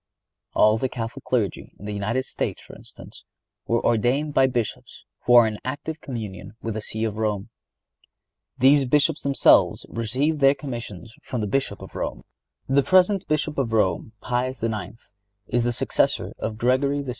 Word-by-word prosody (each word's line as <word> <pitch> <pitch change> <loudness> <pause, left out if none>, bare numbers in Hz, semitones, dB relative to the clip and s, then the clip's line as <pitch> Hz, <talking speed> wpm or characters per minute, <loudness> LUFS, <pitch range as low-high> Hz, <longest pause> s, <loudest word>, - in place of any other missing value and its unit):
All 110 +1 +5
the 130 - -1
Catholic 120 +2 -6
Clergy 115 -7 -1
in 100 - -11
the 105 - -4
United 110 +6 -1
States, - - -3
for - - -13
instance, - - -13 0.4
were 115 0 +1
ordained 120 +6 +2
only - - -8
by 135 -1 +5
Bishops 120 -4 -4 0.2
who 120 - +6
are 120 -1 +9
in 110 -1 -3
active 145 +4 -5
communion 110 -6 -7
with 115 0 -4
the 110 - -4
See 110 +1 -4
of 110 -1 -2
Rome. 105 -3 -1 1.1
These 135 +2 +5
Bishops 150 +4 +2
themselves 140 -1 +4
received 130 +7 -1
their 135 0 +5
commissions 120 - -7
from 125 - -4
the - - 0
Bishop 135 +7 -1
of - - -11
Rome. - - -4 0.4
The 135 +2 +4
present 185 +4 +3
Bishop 155 -1 -1
of 115 -4 -1
Rome, 110 +1 +1
Pius 125 0 -2
IX., 110 -2 -3 0.5
is 120 +3 0
the 120 - +2
successor - - 0
of 110 -1 -3
Gregory 140 +4 +1
XVI. 135 - -7
120 Hz, 170 wpm, -24 LUFS, 110-140 Hz, 1.1 s, are